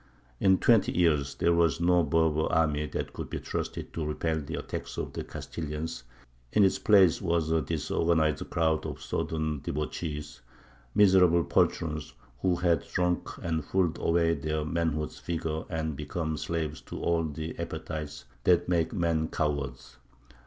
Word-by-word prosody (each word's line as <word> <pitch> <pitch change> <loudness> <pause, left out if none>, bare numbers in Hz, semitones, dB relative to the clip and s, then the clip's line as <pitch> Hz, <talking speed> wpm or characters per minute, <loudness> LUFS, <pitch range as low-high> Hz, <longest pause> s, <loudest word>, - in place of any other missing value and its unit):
In 95 -1 +5
twenty 115 -1 +4
years 75 -5 +2
there 85 - +2
was 85 -1 +3
no 90 0 +4
Berber 80 0 +2
army 75 -2 +2
that - - -4
could - - -6
be - - -3
trusted - - -4
to 80 - -3
repel 80 +1 -1
the 70 - -5
attacks - - -5
of - - -4
the - - -4
Castilians; 75 -4 -5 0.5
in 105 - +4
its 95 - +3
place 95 -6 +5
was 85 -3 0
a 80 0 +3
disorganized 80 +1 0
crowd 80 -1 +1
of - - -6
sodden 80 -2 -2
debauchees, 75 +1 -4 0.5
miserable 90 -4 +6
poltroons, 75 -1 0 0.2
who 90 +6 +2
had 85 -1 +2
drunk 90 -1 0
and 80 -2 -1
fooled 90 +1 0
away 85 0 +3
their 75 +1 -2
manhood's 80 -1 -1
vigour 80 -2 -3
and 80 -2 -2
become 80 +2 -3
slaves 80 -1 -3
to - - -8
all 85 -1 +1
the 80 +1 -5
appetites 80 -2 -5 0.2
that 85 -1 +4
make 85 -2 +1
men 85 -5 +1
cowards. 70 -6 -3
80 Hz, 150 wpm, -29 LUFS, 75-85 Hz, 0.5 s, miserable